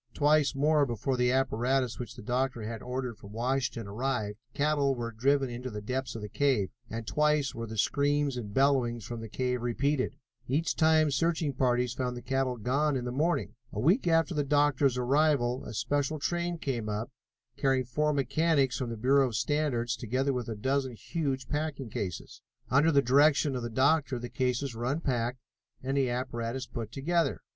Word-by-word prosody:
Twice 145 -1 +3
more 145 +1 +3
before 120 +3 -1
the 125 0 +2
apparatus 130 -1 +1
which 120 - -6
the - - -10
doctor 125 0 -1
had 110 0 -5
ordered 125 -2 -4
from 100 +1 -12
Washington 125 0 -1
arrived 110 -1 -2 0.2
cattle 145 -2 +2
were 120 -1 -4
driven 135 +4 +2
into 125 +2 -5
the 105 -3 -5
depths 130 +5 -3
of 110 - -6
the - - -4
cave, 120 -4 +1 0.2
and 115 0 -5
twice 150 +1 +1
were 115 0 -5
the 110 +1 -7
screams 145 +3 +1
and 110 -5 -5
bellowings 125 -3 +2
from 120 -1 -5
the 115 - -7
cave 125 +1 -1
repeated. 130 +3 0 0.3
Each 150 +6 0
time 155 -2 +4
searching 160 +1 0
parties 125 -1 +1
found 125 -1 -3
the 120 - -8
cattle 130 0 0
gone 140 +6 +1
in 125 -2 -2
the 125 - -2
morning. 155 +7 0 0.2
A - - -4
week 175 - +3
after 165 +1 +3
the 150 -2 0
doctor's 145 -2 +2
arrival, 130 -1 +2
a - - -7
special 145 +5 0
train 175 +3 -1
came 120 -8 -3
up, 105 +5 -3 0.4
carrying 135 -2 +1
four 150 +5 0
mechanics 140 0 +1
from 125 -3 -2
the 115 - -5
Bureau 135 +4 +4
of 115 - -5
Standards, 120 -2 0
together 130 +4 -1
with 125 -2 -3
a 110 - -3
dozen 130 +4 -1
huge 135 +2 -3
packing 145 -5 -3
cases. 90 -5 -5 0.3
Under 145 +5 +5
the 140 -2 +4
direction 140 +2 +4
of 125 - -2
the 120 - -4
doctor 140 +2 +2
the 120 0 -6
cases 125 +2 -1
were 115 +1 -4
unpacked 130 -4 -1 0.5
and 135 +1 -1
the 135 -2 +2
apparatus 120 0 -3
put 115 -3 -6
together. 165 +6 0
130 Hz, 185 wpm, -29 LUFS, 120-145 Hz, 0.5 s, Under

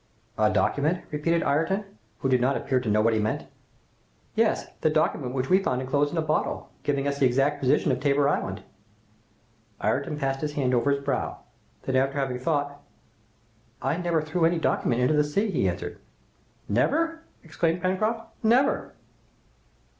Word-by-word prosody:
"A 110 0 +3
document?" 155 +10 +1
repeated 165 +3 +1
Ayrton, 190 +8 +1 0.4
who - - +1
did 130 -2 +3
not 135 +2 +2
appear 130 - 0
to 120 -3 -3
know 105 +1 +3
what 115 +1 +3
he 110 - +1
meant. 110 +1 -1 0.9
"Yes, - - +1 0.2
the - - +3
document 125 +1 0
which 130 0 -1
we 190 +5 +4
found 130 -9 0
enclosed 140 +3 0
in 170 - -4
a 160 - +1
bottle, 155 0 -1
giving 140 -1 0
us 140 0 -2
the 135 - +5
exact 135 +4 +1
position 135 +1 +2
of 125 - 0
Tabor 140 0 +2
Island!" 145 - -1 1.2
Ayrton 150 - -1
passed 135 -1 -1
his 150 -1 -2
hand 130 -3 0
over 125 +3 +2
his 140 0 0
brow, 135 -3 -2 0.5
then 130 - -2
after 135 +2 +1
having 135 -2 -1
thought, 145 0 -1 1.0
"I - - 0
never 170 -3 0
threw 160 +2 -1
any 170 +1 +3
document 125 -6 +1
into 125 - +3
the 150 0 +4
sea!" 200 +9 0
he 100 - +1
answered. 90 - -5 0.7
"Never?" 325 - +1 0.2
exclaimed 165 +1 -1
Pencroft. 215 +5 0
"Never!" 250 +6 +2
145 Hz, 170 wpm, -26 LUFS, 130-165 Hz, 1.2 s, the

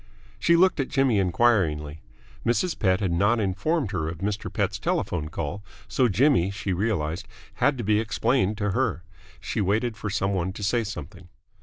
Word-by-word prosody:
She 170 - +4
looked 185 -1 +4
at 135 - 0
Jimmy 135 -6 +2
enquiringly. 85 -7 +1 0.4
Mrs. 160 +9 0
Pett 95 -2 +2
had 95 -3 0
not 100 +7 +2
informed 105 - 0
her 80 -6 -2
of 80 - -6
Mr. 100 +4 -3
Pett's - - -1
telephone 75 -4 -1
call, 80 +6 -4 0.2
so 130 - +2
Jimmy, 110 - +3
she 100 -1 -3
realised, 90 -3 -1 0.3
had 145 -2 +3
to 120 - -3
be 105 0 +2
explained 110 -1 +1
to 105 -2 -1
her. 110 -6 0 0.4
She - - -2
waited 110 +4 0
for 105 - -5
some 100 0 0
one 95 0 -1
to 105 - -7
say 115 +4 +1
something. 95 -3 -8
100 Hz, 175 wpm, -25 LUFS, 90-120 Hz, 0.4 s, She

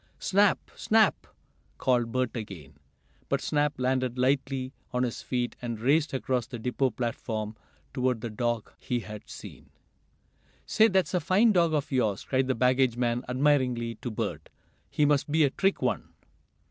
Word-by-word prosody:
"Snap! 200 0 +2
Snap!" 220 -2 +2 0.5
called 120 -3 +1
Bert 130 +1 -1
again. 95 - -7 0.6
But - - +1
Snap 150 -1 0
landed 130 -1 0
lightly 130 0 0 0.2
on 125 0 0
his 120 -2 -3
feet, 125 -1 -2
and 120 -2 -4
raced 145 +6 +2
across 130 -3 -1
the 120 - -6
depot 125 +3 0
platform 110 -2 -3 0.4
toward 125 -3 0
the 115 -2 -4
dog 120 0 -2
he 120 -1 -2
had 105 -1 -9
seen. - - -11 1.0
"Say, 220 0 +5
that's 190 -3 +1
a 180 - +3
fine 190 +8 +4
dog 170 -5 +3
of 145 0 -2
yours!" 110 -7 +1
cried 130 -1 0
the 130 - +1
baggage 125 0 +2
man 120 0 0
admiringly 125 -3 +1
to 120 - -3
Bert. 100 -9 -4 0.4
"He 150 - +2
must 145 0 +2
be 160 +1 +4
a 140 - +3
trick 195 +5 0
one." - - -1
130 Hz, 160 wpm, -28 LUFS, 120-145 Hz, 1.0 s, Say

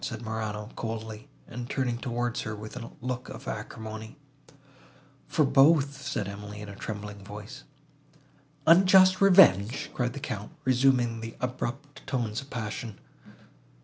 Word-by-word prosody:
said 120 -1 -4
Morano, 110 -1 -4
coldly, 110 -1 -5 0.2
and 120 +1 -7
turning 125 -4 -1
towards 120 -2 -2
her 110 -1 -4
with 110 +2 -9
a 115 -2 -6
look 125 0 -4
of - - -9
acrimony. 110 +3 -6 1.1
"For 155 - +2
both," 140 +1 +5 0.2
replied 100 - -1
Emily, 105 0 -8
in 105 0 -8
a 100 - -8
trembling 105 -1 -6
voice. 105 +7 -9 1.0
"Unjust 185 +3 +7
revenge!" 135 - +6
cried 125 -1 -1
the 140 - -6
Count, 110 -7 -5
resuming 125 -3 +3
the 115 0 -7
abrupt 130 +3 -5
tones 120 -4 -1
of 140 - -14
passion. 110 -3 -5
120 Hz, 135 wpm, -28 LUFS, 110-135 Hz, 1.1 s, Unjust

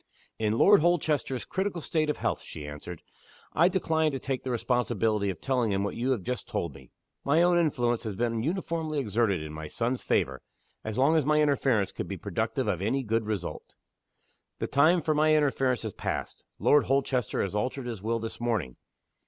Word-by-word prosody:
"In 110 0 +1
Lord 205 +3 +6
Holchester's 150 -6 +1
critical 190 -2 -2
state 155 -1 -1
of 150 - 0
health," - - -1
she 75 - -8
answered, 75 +3 -8 0.5
"I 170 +3 +5
decline 160 -4 +1
to 135 - -2
take 130 0 -3
the 130 - -4
responsibility 115 -4 0
of 90 -4 -4
telling 125 -5 0
him 100 0 0
what 100 - -3
you 125 +3 -1
have 120 -8 0
just 125 +2 -4
told 95 - -3
me. 65 -1 -15 0.3
My 155 +5 +3
own 175 0 +4
influence 120 -8 +1
has 105 -3 -3
been 115 +1 -1
uniformly 160 0 -2
exerted 105 - +1
in 75 0 -7
my 80 0 -6
son's 120 +8 -2
favor - - 0 0.4
as 110 -1 -4
long 140 +5 +4
as 155 - +3
my 150 +2 +3
interference 135 -8 +2
could - - -5
be - - -5
productive - - -2
of - - 0
any 135 +7 0
good 115 -1 -1
result. 100 -5 -4 0.8
The - - -2
time 160 +5 +3
for 155 - +2
my 155 +1 +4
interference 135 -4 +1
has 110 -3 -4
passed. - - -4
Lord 145 -1 +4
Holchester 130 -3 0
has 100 - -3
altered 125 +5 -2
his 115 -5 -5
will 115 +2 0
this 115 0 -6
morning. 110 - -1
125 Hz, 195 wpm, -28 LUFS, 110-150 Hz, 0.8 s, Lord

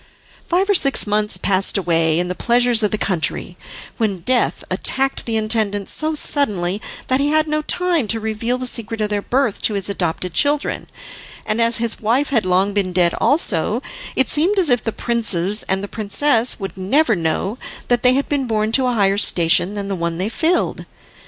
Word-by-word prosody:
Five 365 +3 +1
or 410 - +3
six 275 - +2
months 210 0 0
passed 195 +1 +1
away 165 -3 +1
in 175 +1 0
the 180 - -3
pleasures 240 +2 +2
of 210 - +1
the 215 - -1
country, 180 -6 -2 0.4
when 200 -6 -2
death 250 +7 0
attacked 270 -1 -1
the 225 -1 0
intendant 215 -2 0
so 310 0 -1
suddenly 205 -11 0 0.2
that 260 +1 0
he 280 - +1
had 310 +1 +2
no 305 0 -1
time 340 -5 0
to 225 +2 +1
reveal 220 +3 -2
the 255 - -5
secret 230 -2 -2
of 210 -1 -2
their 205 -1 -1
birth 250 -1 -1
to 215 - +1
his 200 0 -1
adopted 180 -1 -3
children, 290 0 0 0.6
and 220 +1 -1
as 230 0 +3
his 230 -1 -3
wife 250 +7 0
had 225 -8 +1
long 190 +3 +1
been 195 -3 -1
dead 175 -1 +2
also, 235 - +2 0.3
it 265 - +2
seemed 350 +8 0
as 350 -8 +2
if 245 -2 +2
the 225 - -2
princes 210 -4 +1
and 190 +1 0
the - - -4
princess 230 +4 +1
would 195 -1 -6
never 225 +6 +1
know 175 +6 -2 0.3
that 240 -1 +1
they 250 0 +4
had 275 - -1
been 280 -3 -1
born 215 -1 -1
to 260 +2 +3
a 250 - 0
higher 200 -2 +1
station 175 +1 +3
than 200 -1 -4
the 200 - -3
one 170 -1 -3
they 190 +4 -2
filled. 330 +9 -1
220 Hz, 195 wpm, -19 LUFS, 195-260 Hz, 0.6 s, they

